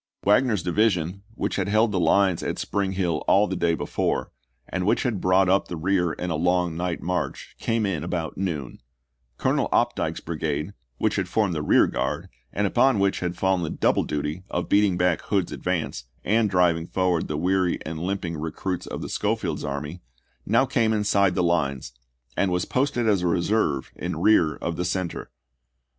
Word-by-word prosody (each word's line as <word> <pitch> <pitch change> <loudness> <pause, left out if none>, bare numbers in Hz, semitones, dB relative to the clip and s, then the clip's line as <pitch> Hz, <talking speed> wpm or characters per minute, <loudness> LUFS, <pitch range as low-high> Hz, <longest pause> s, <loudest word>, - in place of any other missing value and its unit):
Wagner's 105 -2 +3
division, 90 -1 +1
which - - -2
had - - 0
held 110 +2 +3
the 95 - 0
lines 95 0 +3
at - - -3
Spring 100 -1 -1
Hill 90 -5 -1
all 100 +2 +5
the 95 - -3
day 85 -2 +1
before, - - -2 0.4
and 95 0 -2
which 100 - +2
had 115 -7 -1
brought 95 +1 +4
up 95 +2 +2
the 85 - -5
rear 90 0 +1
in 90 +2 -4
a - - 0
long 90 +1 +1
night 85 0 -3
march, 90 +1 -3
came 115 -1 0
in 85 -7 -2
about 80 -3 -3
noon. 80 -12 -4 0.6
Colonel - - +1
Opdycke's - - +1
brigade, 80 +1 -3 0.2
which 110 +6 0
had 95 -2 -1
formed 100 -1 +1
the 75 - -2
rear 75 - +5
guard, - - -3 0.2
and 105 - 0
upon 130 +5 +3
which 100 0 +1
had 90 0 -3
fallen 95 -1 +1
the 80 - -2
double - - +2
duty 75 +4 -3
of - - -3
beating 100 -3 +3
back 90 -2 +2
Hood's 95 -4 0
advance, - - -3 0.2
and 110 0 +2
driving 85 -3 +2
forward 90 -3 0
the 75 - -3
weary 90 +2 +1
and 80 0 -5
limp 95 +2 -2
ing 85 -2 -4
recruits 85 +4 -4
of - - -5
Schofield's - - -1
army, 75 +5 -5 0.5
now 115 +6 +4
came 115 -4 +1
inside 100 -3 +2
the - - +1
lines, 70 -8 0 0.4
and 100 - +1
was 90 0 0
posted 125 -3 0
as 100 -4 +3
a 90 - 0
reserve 85 -5 0
in 85 -1 -4
rear 85 -5 +4
of 85 -1 -4
the 90 - -1
center. 90 -1 -3
90 Hz, 185 wpm, -25 LUFS, 85-100 Hz, 0.6 s, all